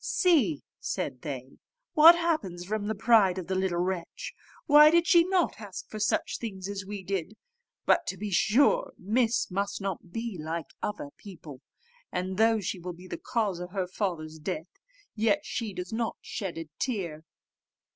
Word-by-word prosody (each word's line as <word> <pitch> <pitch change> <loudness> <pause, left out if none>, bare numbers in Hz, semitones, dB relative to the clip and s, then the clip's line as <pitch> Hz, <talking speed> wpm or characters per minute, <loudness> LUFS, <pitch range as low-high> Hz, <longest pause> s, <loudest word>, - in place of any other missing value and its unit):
"See," 280 - +2 0.2
said 130 -3 -3
they, 130 -3 -7 0.3
"what 325 +3 +9
happens 310 - -1
from 205 +1 -2
the 220 - -1
pride 200 -4 +4
of 185 - -4
the 190 - -3
little 185 -2 0
wretch; 180 -1 -3 0.3
why 300 0 +8
did 340 +1 +4 0.3
not 370 -4 +2
she - - -15
ask 200 -3 -8
for 215 - -5
such 210 - 0
things 195 -5 -5
as 200 -1 -4
we 200 0 -6
did? 195 +2 -3 0.5
But, - - +3
to - - -3
be 210 -1 -4
sure, 280 - +3
Miss 225 +2 +1
must 200 +2 -2
not 190 -3 -5
be 225 -3 -4
like 160 -1 -4
other 175 -8 -4
people; 160 -9 -11 0.5
and 185 +1 -3
though 225 0 +4
she 190 -1 -3
will 180 +1 -6
be 180 +2 -13
the - - -6
cause 210 -7 0
of 180 +1 -7
her 190 -2 0
father's 170 -5 -3
death, 165 0 -4 0.4
yet 225 +7 +2
she 230 -3 -3
does 180 +1 -6
not 230 0 -2
shed 190 -5 -5
a 165 -1 -5
tear." 175 - -2
195 Hz, 175 wpm, -28 LUFS, 175-225 Hz, 0.5 s, what